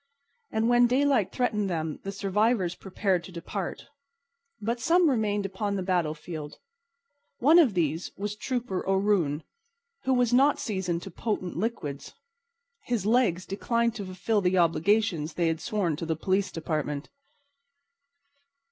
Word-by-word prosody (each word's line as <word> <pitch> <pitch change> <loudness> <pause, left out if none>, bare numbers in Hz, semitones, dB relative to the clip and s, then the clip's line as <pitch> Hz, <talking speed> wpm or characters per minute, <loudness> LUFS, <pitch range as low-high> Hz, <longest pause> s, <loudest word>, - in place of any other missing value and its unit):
And 220 +1 0
when 240 0 +5
daylight 260 -4 +2
threatened 210 -5 0
them 160 -3 -3
the 195 - -5
survivors 200 -1 +1
prepared 190 -1 -1
to 185 - -11
depart. 175 +2 -5 0.7
But 230 +3 -2
some 345 +5 +4
remained 210 -4 0
upon 200 +1 -2
the 190 - -2
battlefield. 160 -4 -2 0.8
One 310 +7 +6
of 260 - +4
these 165 0 0
was 205 +1 -3
Trooper 240 -5 -3
O'Roon, 190 -7 +1 0.6
who 260 0 +3
was 245 -1 +2
not 275 +3 +5
seasoned 180 -5 -2
to 195 - -8
potent 185 -2 -3
liquids. 165 -9 -4 0.7
His 235 -6 -1
legs 215 -6 +2
declined 235 +3 0
to 210 -4 -6
fulfil 195 +3 0
the 185 0 +2
obligations 170 -1 +2
they 170 -2 +2
had 160 0 -2
sworn 190 -7 0
to 165 - -5
the 160 - 0
police 190 +5 0
department. 155 -3 -3
195 Hz, 140 wpm, -27 LUFS, 170-230 Hz, 0.8 s, One